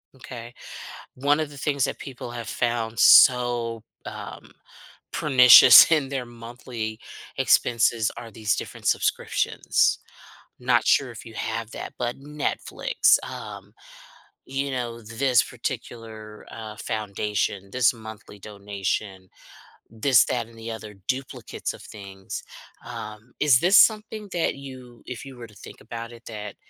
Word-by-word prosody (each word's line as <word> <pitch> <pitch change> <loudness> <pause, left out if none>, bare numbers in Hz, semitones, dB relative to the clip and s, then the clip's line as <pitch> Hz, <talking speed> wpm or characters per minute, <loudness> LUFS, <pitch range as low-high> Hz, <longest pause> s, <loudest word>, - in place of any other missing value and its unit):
M'kay. 120 -2 -10 0.6
One 145 +4 +1
of 155 -2 -2
the 145 - -13
things 140 -2 -1
that - - -5
people 125 -3 -8
have 120 -1 -7
found 115 -2 -2
so, 120 -3 +5 0.2
um, - - -9 0.6
pernicious 125 +1 +8
in 150 -4 +3
their 135 -3 -3
monthly 115 -1 -7 0.4
expenses 115 -2 +2
are 115 -2 -9
these 110 -2 -1
different - - -8
subscriptions. - - +1 0.6
Not 125 -2 +1
sure 135 -3 +3
if 115 - -11
you 110 - -11
have 110 +2 -4
that, - - -7
but 120 -1 -2
Netflix, 150 +1 0
um, - - -9 0.7
you 135 +1 -3
know, 120 -2 -4
this 120 +3 +1
particular, 110 -2 -7
uh, 110 -2 -9
foundation, 105 -2 -3
this 125 -1 +3
monthly 110 -2 -12
donation, 100 -1 -5 0.6
this, 120 +4 +3
that, 120 -3 -2
and 115 0 -18
the 115 0 -6
other 110 -2 -9
duplicates 130 0 -4
of - - -13
things, 95 -2 -9 0.4
um, 110 +3 -9
is 140 -5 +5
this 185 +4 +5
something 215 -1 +3
that 170 -5 0
you 130 -3 -12
if 125 +1 -7
you 135 -2 -11
were 120 - -9
to 105 - -20
think - - -13
about 115 0 -8
it, 120 0 -14
that 105 -3 -7
120 Hz, 135 wpm, -24 LUFS, 110-130 Hz, 0.7 s, pernicious